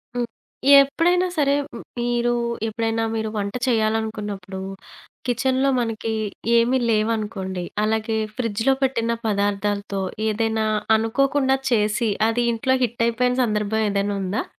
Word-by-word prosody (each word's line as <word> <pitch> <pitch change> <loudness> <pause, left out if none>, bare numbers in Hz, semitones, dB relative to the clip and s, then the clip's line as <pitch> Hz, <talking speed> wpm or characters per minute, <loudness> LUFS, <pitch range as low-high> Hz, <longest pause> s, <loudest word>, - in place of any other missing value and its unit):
హ్మ్. 240 -1 -1 0.5
ఎప్పుడైనా 350 +6 +2
సరే 280 -1 +3 0.2
హ్మ్ - - -8 0.2
మీరు 240 0 +1 0.3
ఎప్పుడైనా 225 +1 -1
మీరు 220 -1 -2
వంట 200 0 -2
చేయాలనుకున్నప్పుడు 215 -4 -1 0.7
కిచెన్‌లో 260 +2 +1
మనకి 225 -1 -2 0.5
ఏమీ 245 +3 +3
లేవనుకోండి, 210 -4 -1 0.2
అలాగే 220 0 0 0.2
ఫ్రిడ్జ్‌లో 230 +2 +1
పెట్టిన 235 -3 +1 0.2
పదార్థాలతో 200 -1 -1 0.3
ఏదైనా 220 0 0 0.3
అనుకోకుండా 265 +4 +1
చేసి 215 +1 +2 0.2
అది 240 +1 0
ఇంట్లో 260 +3 +1
హిట్ 235 0 -2
అయిపోయిన 250 +2 +1
సందర్భం 210 0 0
ఏదైనా 200 0 0
ఉందా? 190 +4 -1
225 Hz, 110 wpm, -22 LUFS, 210-245 Hz, 0.7 s, సరే